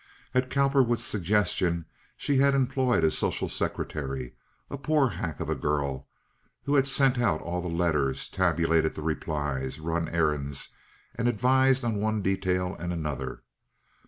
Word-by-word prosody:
At 130 0 +1
Cowperwood's 135 -4 +2
suggestion 90 -4 +1 0.3
she 145 -2 0
had 140 +1 +4
employed 130 -5 +2
a 80 - +4
social - - 0
secretary, 65 -4 -3 0.3
a - - -6
poor 140 -1 +2
hack 85 -6 -5
of - - -3
a - - +1
girl, 70 -3 -2 0.6
who 140 - -1
had 135 -1 +4
sent 135 -2 +3
out 90 -11 +2
all 90 +1 -3
the 90 - -4
letters, 80 -6 0
tabulated 85 -1 +1
the 75 - -6
replies, 75 -4 -2
run 80 +1 -2
errands, 75 -4 0 0.4
and 120 -1 -1
advised 130 +3 +3
on 115 -3 0
one 110 0 0
detail 95 -1 0
and 85 +1 -3
another. 75 -5 -4
90 Hz, 145 wpm, -27 LUFS, 80-125 Hz, 0.6 s, had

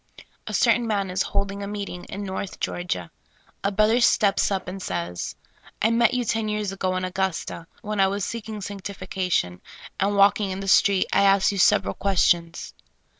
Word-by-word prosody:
A - - -5
certain 240 -1 +3
man 200 -4 -1
is 185 +1 0
holding 200 +1 -2
a 200 - -4
meeting 200 -3 -5
in 200 - -6
North 190 0 -5
Geor 175 0 -3
gia. 90 - -3 0.5
A 200 - +1
brother 215 +4 +3
steps 205 -4 +3
up 190 -2 -2
and 190 +1 -6
says: 85 - -4 0.2
" - - -24
I 225 - +4
met 235 +1 +3
you 250 -1 0
ten 225 -1 0
years 210 -2 -2
ago 185 -1 -2
in 185 0 -1
Augusta, 185 -3 -3 0.2
when 210 0 -3
I 195 - +5
was 200 0 -2
seeking 220 -2 -6
sanctifica 190 -2 -5
tion, 90 - 0 0.4
and 200 +1 +1
walking 200 0 +4
in 190 0 -4
the 195 - -5
street, 195 0 +4
I 195 - +4
asked 195 0 +4
you 200 - -3
several - - +4
questions. 175 -4 +1
195 Hz, 190 wpm, -24 LUFS, 185-205 Hz, 0.5 s, I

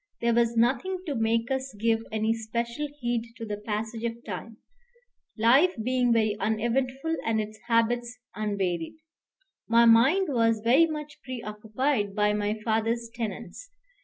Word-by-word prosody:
There 235 0 +2
was 235 0 +2
nothing 265 +11 +2
to 300 - -2
make 230 0 0
us 265 -2 -2
give 225 0 +2
any 220 +1 +1
special 235 +5 -3
heed 235 -2 -2
to 230 - -6
the 210 -1 -4
passage 220 +2 -4
of 235 0 -4
time, 215 +2 -7 0.8
life 265 +11 +5
being 250 0 +2
very 220 -2 +2
uneventful 255 +8 -1
and 225 -1 +1
its 215 0 -5
habits 240 +1 +1 0.2
unvaried. 195 -6 -2 0.7
My 235 +1 +6
mind 270 +12 +5
was 230 -2 +2
very 265 +8 +5
much 300 -2 -6
preoccupied 220 -1 -2
by 210 -1 +2
my 210 +1 -1
father's 230 +1 0
tenants. 235 - -6
230 Hz, 140 wpm, -27 LUFS, 220-250 Hz, 0.8 s, My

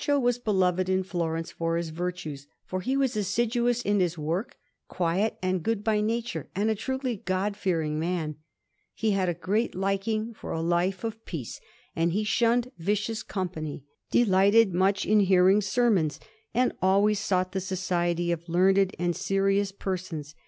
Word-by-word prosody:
Panel_)] - - -4
Baccio - - +3
was 245 -1 +1
beloved 185 -5 +1
in 190 0 +2
Florence 165 -3 -3
for 165 0 -1
his 170 -1 -2
virtues, 160 -4 -5 0.2
for 185 0 -3
he 260 +8 0
was 265 -3 +1
assiduous 235 +4 +1
in 205 0 +2
his 175 -2 0
work, 175 - -3 0.3
quiet 185 +5 0
and 185 -1 0
good 220 +3 -1
by 215 -1 +2
nature, 230 +2 -2
and 210 +3 +1
a - - +3
truly 260 +2 -3
God 190 +2 -1
fearing 160 -6 -1
man; 160 -3 -2 0.6
he 220 -1 0
had 190 -2 +1
a 175 - -1
great 205 +7 -1
liking 195 +4 -1
for - - -7
a 160 - -2
life 175 +3 0
of 225 0 -5
peace, 145 -10 -6 0.3
and 165 +1 +1
he 210 +3 +1
shunned 235 +4 +2
vicious 210 +5 -1
company, 160 -7 -4 0.3
delighted 200 -1 +4
much 195 +3 +2
in 215 +1 +4
hearing 190 +1 +5
sermons, 200 -7 +1 0.3
and 250 +1 +1
always 200 +3 +3
sought 185 -3 0
the 190 0 -2
society 175 -2 -1
of 170 0 -4
learned 190 +2 +3
and 175 -1 0
serious 195 0 +1
persons. 180 -6 -5
190 Hz, 165 wpm, -27 LUFS, 175-215 Hz, 0.6 s, hearing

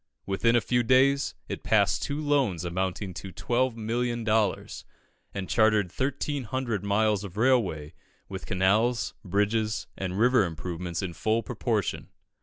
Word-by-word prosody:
Within 115 +5 +2
a 120 - +4
few 120 +5 +1
days, 135 +4 +3
it - - -5
passed - - +2
two 140 +1 -2
loans 135 - +1
amounting 95 +2 -2
to 90 +3 -7
12,000,000 120 0 -1
dollars, 110 -3 0 0.5
and 95 -2 -5
chartered 110 -4 +3
1,300 130 -5 -2
miles 105 0 +1
of 100 -1 -9
railway, 110 - +1 0.3
with 95 -1 -7
canals, 105 +6 +2
bridges, 105 +3 0
and 95 -1 -4
river 125 +1 +4
improvements 85 +1 -4
in 90 -3 -4
full 110 +6 0
proportion. - - -2
110 Hz, 130 wpm, -27 LUFS, 95-120 Hz, 0.5 s, a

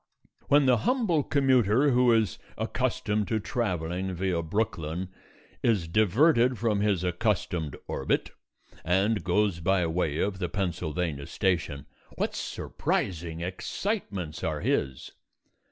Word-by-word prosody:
When 145 0 +5
the 125 -2 +5
humble 190 - +1
commuter 130 -2 +3
who 125 -1 +4
is 110 -2 +2 0.2
accustomed 105 0 -1
to 110 - 0
travelling 95 -5 -2
via 90 -1 0
Brooklyn 85 -1 -2 0.5
is 105 -8 +2
diverted 120 - +3
from 110 -3 +1
his 100 -4 +1
accustomed 90 - -1
orbit, 65 - -1 0.5
and 100 +5 +1
goes 95 0 +1
by 90 +1 +2
way 80 -2 -1
of 95 +1 -1
the 90 -3 -2
Pennsylvania 85 -5 -2
Station, 85 -8 -1 0.3
what - - -1
surprising 85 -2 -2
excitements 95 - -3
are 75 -2 -1
his. 65 -2 -1
95 Hz, 115 wpm, -28 LUFS, 85-115 Hz, 0.5 s, When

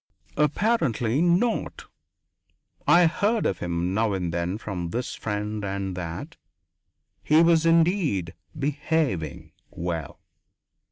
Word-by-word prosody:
Apparently 150 - +1
not. 175 +7 +1 1.0
I 175 0 +7
heard 205 +7 +1
of 95 - 0
him 85 +1 -2
now 110 0 +1
and 90 -3 -2
then 85 +3 -1
from 90 -6 -5
this 120 +7 -3
friend 105 0 -3
and 95 -1 -3
that. 85 -2 -6 0.8
He 155 +2 +4
was 165 -1 +4
indeed 165 - +2 0.2
"behaving" 145 - -1 0.2
well. 85 -4 -5
110 Hz, 105 wpm, -25 LUFS, -, 1.0 s, I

